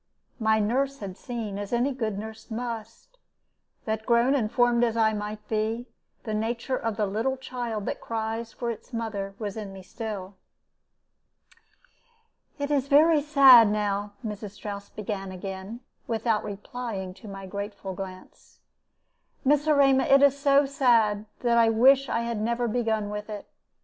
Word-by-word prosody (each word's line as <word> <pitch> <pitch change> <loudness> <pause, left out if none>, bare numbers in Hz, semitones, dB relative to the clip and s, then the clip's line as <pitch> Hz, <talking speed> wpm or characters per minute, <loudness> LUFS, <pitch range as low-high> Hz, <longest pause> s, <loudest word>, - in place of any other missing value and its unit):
My 220 -1 +3
nurse 265 +6 0
had 195 -5 -7
seen, 220 -4 -5
as 205 0 -6
any 245 +3 +1
good 220 -6 -3
nurse 220 +1 -8
must, 230 - -6 0.7
that, 220 0 -2
grown 235 +3 +4
and 225 -6 0
formed 240 -1 +3
as 230 -1 +1
I 220 -1 +3
might 210 0 -5
be, 220 +2 -1 0.4
the 220 - -4
nature 230 +4 -1
of 225 -4 -3
the 210 - +1
little 225 +7 -1
child 240 -5 -4
that - - -4
cries 225 0 -3
for 235 +1 -3
its 230 +3 -10
mother 205 -4 -4
was 205 -3 -4
in 210 -3 -6
me 190 -1 -10
still. 205 -2 -6 2.2
"It 285 0 -3
is 280 -2 +1
very 305 +2 +5
sad 270 -6 +8
now," 205 -1 -1
Mrs. 210 -1 -5
Strouss 200 -1 -7
began 195 -2 -5
again, 190 +5 -7 0.3
without 225 -1 0
replying 205 -2 -5
to 195 +3 -14
my 195 -1 -8
grateful 200 0 -6
glance; 185 0 -10 0.9
"Miss 295 +2 +3
Erema, 275 -3 +4
it 275 +1 +5
is 280 -1 +6
so 280 0 +4
sad 230 -7 +2
that 235 -1 +3
I 230 -1 +5
wish 265 +5 +5
I 230 - 0
had 235 -2 -3
never 235 +2 0
begun 220 -3 -1
with 210 +1 -5
it. 210 -1 -7
225 Hz, 155 wpm, -26 LUFS, 205-245 Hz, 2.2 s, sad